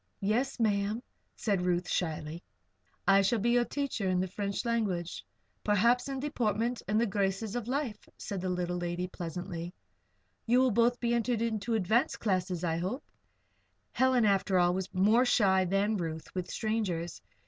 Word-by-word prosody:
"Yes, 230 Hz, +7 st, 0 dB
Ma'am," 210 Hz, +1 st, +1 dB, 0.3 s
said 200 Hz, -5 st, 0 dB
Ruth, 180 Hz, 0 st, 0 dB
shyly. 160 Hz, -1 st, -2 dB, 0.7 s
"I 195 Hz, +1 st, +6 dB
shall 195 Hz, +5 st, +2 dB
be 235 Hz, +3 st, +1 dB
your 240 Hz, 0 st, +3 dB
teacher 265 Hz, -9 st, -2 dB
in 180 Hz, -1 st, +2 dB
the 185 Hz, -, 0 dB
French 200 Hz, +3 st, -3 dB
language 200 Hz, -8 st, -1 dB, 0.4 s
perhaps 235 Hz, +6 st, +3 dB
in 270 Hz, -1 st, -3 dB
deportment 240 Hz, -4 st, -1 dB
and 210 Hz, +2 st, +2 dB
the 235 Hz, -, +3 dB
graces 200 Hz, +1 st, -1 dB
of 240 Hz, -2 st, -3 dB
life," 255 Hz, -5 st, -3 dB, 0.2 s
the 185 Hz, -2 st, -2 dB
little 180 Hz, 0 st, -1 dB
lady 175 Hz, 0 st, -2 dB
said, 180 Hz, -, -6 dB
pleasantly. 175 Hz, 0 st, -5 dB, 0.7 s
"You 245 Hz, +2 st, +5 dB
will 260 Hz, -1 st, +3 dB
both 235 Hz, +3 st, +3 dB
enter 235 Hz, 0 st, +1 dB
into 225 Hz, 0 st, -1 dB
advanced 220 Hz, -, +1 dB
classes, 185 Hz, -4 st, -1 dB
I 165 Hz, -2 st, 0 dB
hope?" 190 Hz, -, -3 dB, 0.9 s
Helen, 260 Hz, -3 st, +3 dB
after 195 Hz, -2 st, +2 dB
all, 175 Hz, 0 st, +4 dB
was 190 Hz, +1 st, -3 dB
more 210 Hz, +6 st, +4 dB
shy 190 Hz, -6 st, +3 dB
than 200 Hz, +4 st, +1 dB
Ruth 160 Hz, -3 st, -5 dB
with 180 Hz, -1 st, -4 dB
strangers. 200 Hz, -7 st, -2 dB
200 Hz, 160 wpm, -30 LUFS, 180-235 Hz, 0.9 s, I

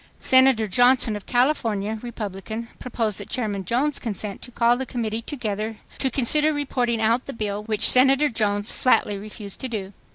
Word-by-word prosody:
Senator 260 Hz, -4 st, +4 dB
Johnson 245 Hz, +1 st, +3 dB
of 205 Hz, -, -9 dB
California, 225 Hz, -5 st, 0 dB
Republican, 220 Hz, 0 st, -6 dB
proposed 225 Hz, -4 st, -3 dB
that -, -, -9 dB
Chairman 210 Hz, -6 st, -2 dB
Jones 265 Hz, -, 0 dB
consent 210 Hz, -3 st, -5 dB
to -, -, -7 dB
call 235 Hz, 0 st, +2 dB
the 260 Hz, -, -3 dB
Committee 225 Hz, -2 st, -3 dB
together 220 Hz, -4 st, -4 dB, 0.2 s
to 265 Hz, -, +1 dB
consider 295 Hz, +5 st, +2 dB
reporting 250 Hz, -5 st, -1 dB
out 230 Hz, +3 st, +1 dB
the 275 Hz, -, -5 dB
bill, 210 Hz, -2 st, -3 dB
which 215 Hz, -1 st, +3 dB
Senator 270 Hz, +3 st, +5 dB
Jones 210 Hz, -3 st, -1 dB
flatly 225 Hz, -4 st, +2 dB
refused 205 Hz, -1 st, -8 dB
to 260 Hz, -, -4 dB
do. 205 Hz, -5 st, -5 dB
230 Hz, 165 wpm, -23 LUFS, 210-255 Hz, 0.2 s, Senator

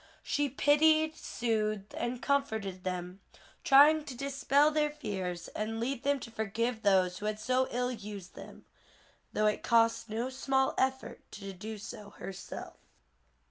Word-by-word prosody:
She 290 Hz, -1 st, 0 dB
pitied, 310 Hz, +3 st, +4 dB
soothed 215 Hz, -6 st, -2 dB
and 240 Hz, +1 st, -3 dB
comforted 220 Hz, -10 st, -1 dB
them, 180 Hz, 0 st, -4 dB, 0.4 s
trying 300 Hz, +3 st, +7 dB
to 260 Hz, -5 st, -7 dB
dispel 280 Hz, +2 st, +2 dB
their 300 Hz, -1 st, +2 dB
fears 190 Hz, -, -4 dB
and 220 Hz, +1 st, -3 dB
lead 245 Hz, +2 st, -2 dB
them 280 Hz, 0 st, +1 dB
to 230 Hz, -, -8 dB
forgive 220 Hz, +2 st, -2 dB
those 185 Hz, -3 st, +3 dB
who 210 Hz, -, -3 dB
had 215 Hz, 0 st, -2 dB
so 255 Hz, +3 st, +1 dB
ill 250 Hz, +1 st, -1 dB
used 205 Hz, -5 st, -8 dB
them, -, -, -12 dB, 0.7 s
though 215 Hz, -, +1 dB
it 210 Hz, -, +1 dB
cost 230 Hz, -1 st, +3 dB
no 230 Hz, +4 st, -2 dB
small 265 Hz, 0 st, +1 dB
effort 265 Hz, 0 st, -1 dB
to 195 Hz, -1 st, -7 dB
do 215 Hz, +4 st, -7 dB
so 210 Hz, 0 st, -9 dB
herself. 195 Hz, -2 st, -8 dB
230 Hz, 145 wpm, -31 LUFS, 205-275 Hz, 0.7 s, trying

